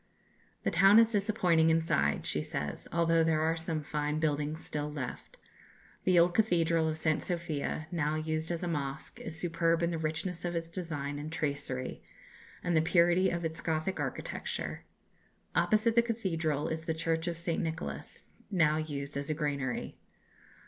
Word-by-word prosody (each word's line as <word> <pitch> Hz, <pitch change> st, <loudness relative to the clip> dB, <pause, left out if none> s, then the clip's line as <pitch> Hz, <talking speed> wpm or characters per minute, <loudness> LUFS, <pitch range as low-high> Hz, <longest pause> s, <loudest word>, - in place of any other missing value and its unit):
"The -, -, +1 dB
town 195 Hz, +4 st, +7 dB
is 230 Hz, 0 st, +6 dB
disappointing 185 Hz, -6 st, +3 dB
inside," 160 Hz, -, +2 dB
she -, -, -1 dB
says, 75 Hz, -1 st, -4 dB
"although 165 Hz, -1 st, +3 dB
there 160 Hz, -1 st, +2 dB
are 160 Hz, +1 st, +2 dB
some 165 Hz, -2 st, -3 dB
fine 150 Hz, +1 st, -1 dB
buildings 150 Hz, 0 st, -1 dB
still 150 Hz, 0 st, -3 dB
left. 130 Hz, -4 st, -6 dB, 0.7 s
The 185 Hz, -1 st, +4 dB
old 175 Hz, +1 st, +5 dB
cathedral 165 Hz, -6 st, +3 dB
of 155 Hz, -, -2 dB
St. 155 Hz, -1 st, +1 dB
Sophia, 165 Hz, -3 st, -2 dB
now 155 Hz, -3 st, 0 dB
used 155 Hz, 0 st, -2 dB
as 170 Hz, -1 st, -2 dB
a -, -, -1 dB
mosque, 145 Hz, -3 st, -3 dB
is 165 Hz, 0 st, -3 dB
superb 170 Hz, -1 st, +1 dB
in 170 Hz, -, +1 dB
the 165 Hz, -, -2 dB
richness 160 Hz, +3 st, -2 dB
of 175 Hz, -1 st, -2 dB
its 165 Hz, 0 st, -3 dB
design 145 Hz, -5 st, -4 dB
and 150 Hz, +2 st, -6 dB
tracery, 145 Hz, -4 st, -3 dB, 0.6 s
and 175 Hz, -1 st, +1 dB
the 160 Hz, -, +5 dB
purity 175 Hz, +3 st, +4 dB
of 170 Hz, -1 st, -2 dB
its 160 Hz, +1 st, -3 dB
Gothic 160 Hz, +3 st, -1 dB
architecture. -, -, -4 dB, 0.7 s
Opposite 220 Hz, +1 st, +3 dB
the 235 Hz, -, +7 dB
cathedral 165 Hz, -11 st, -1 dB
is 160 Hz, 0 st, -3 dB
the 160 Hz, -, -1 dB
Church 165 Hz, +1 st, -1 dB
of 170 Hz, -1 st, -2 dB
St. 165 Hz, 0 st, -1 dB
Nicholas, 165 Hz, 0 st, -5 dB, 0.3 s
now 155 Hz, -6 st, +3 dB
used 145 Hz, -2 st, -4 dB
as 140 Hz, +1 st, -2 dB
a 155 Hz, -, 0 dB
granary. 140 Hz, -4 st, -2 dB
160 Hz, 165 wpm, -31 LUFS, 150-170 Hz, 0.7 s, town